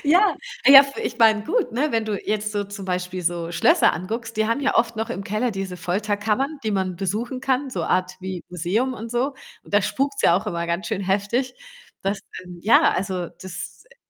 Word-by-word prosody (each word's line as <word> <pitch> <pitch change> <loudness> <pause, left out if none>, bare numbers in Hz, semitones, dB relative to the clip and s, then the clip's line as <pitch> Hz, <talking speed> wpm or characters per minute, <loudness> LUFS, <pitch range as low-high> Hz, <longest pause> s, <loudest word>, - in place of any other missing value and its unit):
Ja, 360 +8 +4 0.3
ah, - - +9
ja, 275 -1 +12
f 275 0 -8
ich - - -4
meine 220 -2 +5
gut, 435 - 0
ne, 285 +6 0
wenn 225 -2 0
du 215 -1 -2
jetzt 210 0 -1
so 205 -1 -1
zum 200 0 -8
Beispiel 180 0 -3
so 170 -1 -1
Schlösser 170 - +4
anguckst, 225 +6 -5
die 220 0 +2
haben 230 +5 0
ja 275 - +1
oft 230 0 +2
noch 220 +1 -3
im 200 -5 -4
Keller 215 +5 -1
diese 195 -3 -5
Folterkammern, 210 - -1
die 220 - -1
man 190 -2 -1
besuchen 215 +7 -3
kann, 270 +1 0
so - - -3
Art 185 0 0
wie 185 -2 -6
Museum 180 +9 -1
und 230 -1 -7
so 255 +4 0 0.3
und - - -7
da 205 - +5
spukt's 275 +6 -1
ja 170 - +5
auch 205 +4 -3
immer 170 -4 -2
ganz 170 +4 -2
schön 215 -4 -2
heftig, 205 +7 0 0.5
dass 195 +1 -1 0.2
ähm, 180 -1 -11
ja, 225 +4 +5
also, 185 -2 -2
das, 190 - -8
äh 485 - -21
210 Hz, 215 wpm, -23 LUFS, 185-245 Hz, 0.5 s, ja